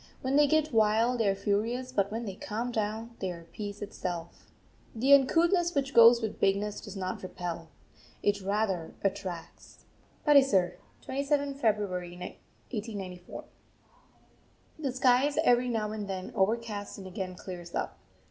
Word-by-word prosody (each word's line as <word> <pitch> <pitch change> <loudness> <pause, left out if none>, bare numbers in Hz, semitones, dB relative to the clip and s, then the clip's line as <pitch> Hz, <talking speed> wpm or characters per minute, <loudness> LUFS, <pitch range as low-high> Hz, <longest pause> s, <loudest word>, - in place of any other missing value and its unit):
When 260 +1 0
they 295 0 +6
get 310 -1 +2
wild 225 +3 +3
they 215 -3 +3
are 195 - +1
furious, 225 +6 -1
but 200 -5 +1
when 230 +2 -3
they 195 - -4
calm 225 +5 -4
down 220 +1 -2
they 190 - -2
are 170 -1 -9
peace 205 +4 -7
itself. 175 -4 -6 0.5
The 260 +5 +4
uncouthness 340 +5 +4
which 275 -1 0
goes 235 0 +8
with 220 - -3
bigness 200 +1 +1
does 205 - -9
not 185 -1 -3
repel, 175 -3 -5 0.5
it 205 0 +2
rather 195 -4 -1
attracts. 190 -4 -5 0.4
PATISAR, 265 - +4 0.3
27th 280 +1 0
February 185 -5 0
1894. 190 -1 -7 1.4
The 280 -4 -1
sky 255 +1 +4
is 290 - -4
every 245 -2 +4
now 215 -3 -1
and 210 -2 -4
then 190 -1 -5
overcast 210 0 -1
and 195 - -9
again 185 0 -5
clears 175 -2 -8
up. - - -3
210 Hz, 145 wpm, -30 LUFS, 190-250 Hz, 1.4 s, goes